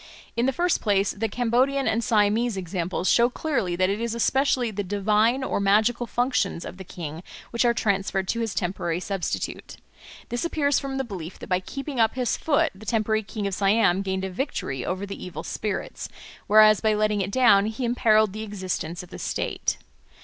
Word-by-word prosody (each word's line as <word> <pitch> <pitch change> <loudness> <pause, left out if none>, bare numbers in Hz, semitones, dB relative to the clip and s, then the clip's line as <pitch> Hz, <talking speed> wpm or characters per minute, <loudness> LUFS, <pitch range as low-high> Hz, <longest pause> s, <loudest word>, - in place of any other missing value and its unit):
In 235 +2 +1
the - - +3
first 345 +4 +1
place, 200 -2 +2
the 220 +2 -2
Cambodian 250 +5 +1
and 230 +1 +1
Siamese 215 0 +2
examples 180 0 -3
show 235 +1 +5
clearly 245 - -1
that 185 +1 +2
it 200 +3 -1
is 235 -1 -2
especially 255 0 +1
the 205 0 -3
divine 210 +6 +2
or 260 - -1
magical 220 +5 +2
functions 245 -7 0
of 180 - -8
the 190 - -8
king 165 -3 -7 0.3
which 235 +1 +1
are 235 - +4
transferred 195 -2 0
to 230 - 0
his 225 -3 -2
temporary 175 -2 -1
substitute. 195 -1 -4 0.5
This 240 - -2
appears 290 -5 +1
from 270 -1 -4
the 270 - 0
belief 185 -7 -7
that - - -10
by 180 -1 +2
keeping 275 +7 -6
up 225 +1 +3
his 250 -2 0
foot 320 +1 +1
the 200 +3 -14
temporary 220 -1 +1
king 210 0 -5
of 200 - -2
Siam 195 -1 +3
gained 190 -1 -2
a 190 - -4
victory 180 - -3
over 185 +2 -3
the 200 0 -7
evil 175 -4 -6
spirits, 210 -2 -4 0.4
whereas 215 0 +6
by 220 -1 +2
letting 210 -1 +1
it 190 - -2
down 205 -3 +5
he 220 +3 -3
imperilled 220 -4 +3
the 215 - -5
existence 185 -5 -4
of 180 - -14
the - - -8
state. - - -2
215 Hz, 195 wpm, -25 LUFS, 190-240 Hz, 0.5 s, whereas